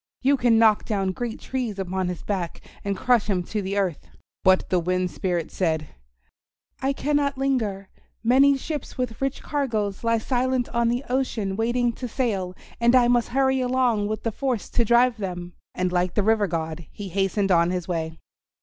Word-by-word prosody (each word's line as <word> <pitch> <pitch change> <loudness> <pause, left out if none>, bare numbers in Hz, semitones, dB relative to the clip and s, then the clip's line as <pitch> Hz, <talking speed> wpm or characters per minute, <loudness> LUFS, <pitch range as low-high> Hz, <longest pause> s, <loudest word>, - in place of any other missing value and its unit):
You 275 +2 +5
can 240 -3 +3
knock 220 -2 +5
down 195 -4 0
great 235 +4 -4
trees 245 -6 -3
upon 190 -1 -2
his 180 -1 -5
back 185 -5 -3 0.2
and 200 -1 -2
crush 245 0 +2
him 185 -3 +1
to 210 +4 -3
the 195 +1 -3
earth." 185 -6 -1 0.4
But 185 0 +4
the 180 - +4
Wind 180 +1 0
Spirit 175 -4 -2
said, 160 -4 -1 0.9
"I 270 - +1
cannot 285 0 0
linger. 225 -8 -1 0.4
Many 270 +4 +5
ships 295 +1 -5
with 250 -2 -3
rich 270 0 -2
cargoes 225 -9 -2
lie 230 0 +3
silent 250 +1 0
on 235 0 +1
the 240 +3 -1
ocean 240 -6 -1
waiting 240 +2 +1
to 250 - -5
sail, 200 -7 -2 0.2
and 235 +2 +4
I 245 -1 +6
must 240 -1 +3
hurry 265 0 +2
along 250 -4 +1
with 215 +1 -3
the 230 - 0
force 250 -2 -2
to 240 - +2
drive 235 +1 +4
them." 180 -3 -5 0.2
And 180 0 0
like 180 0 0
the 210 - +2
River 215 -1 +3
God 160 -1 -4
he 200 -2 -7
hastened 195 +1 0
on 170 -1 +4
his 180 -2 -2
way. 160 -2 -3
215 Hz, 185 wpm, -24 LUFS, 185-250 Hz, 0.9 s, I